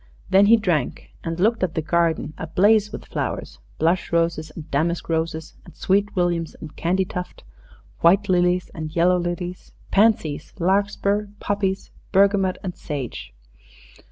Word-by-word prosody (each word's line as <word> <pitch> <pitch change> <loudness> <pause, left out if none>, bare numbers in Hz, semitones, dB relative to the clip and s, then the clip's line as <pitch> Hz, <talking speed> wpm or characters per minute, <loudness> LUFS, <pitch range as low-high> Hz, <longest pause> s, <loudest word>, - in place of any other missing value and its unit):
Then 195 +1 +6
he 230 +2 +7
drank, 170 - -1
and 165 +1 -4
looked 225 +5 +2
at 185 -3 -1
the 160 - 0
garden 165 -2 +1
ablaze 205 +6 +3
with - - -8
flowers - - -4 0.2
blush 170 +3 +1
roses 165 -2 0
and 155 - -7
damask 165 +5 0
roses, 160 -1 -2
and - - -15
sweet 200 +2 +1
williams 175 -3 0
and 155 - -10
candytuft, 180 +1 -2 0.6
white 195 +5 +4
lilies 180 -1 +2
and 155 0 -6
yellow 180 +2 +4
lilies, 175 +1 -5 0.2
pansies, 195 -8 +2
larkspur, 200 +2 +1
poppies, 200 -2 -2 0.2
bergamot, 195 -1 +3
and 185 -2 -4
sage. 140 -6 -6
180 Hz, 135 wpm, -23 LUFS, 165-195 Hz, 0.6 s, he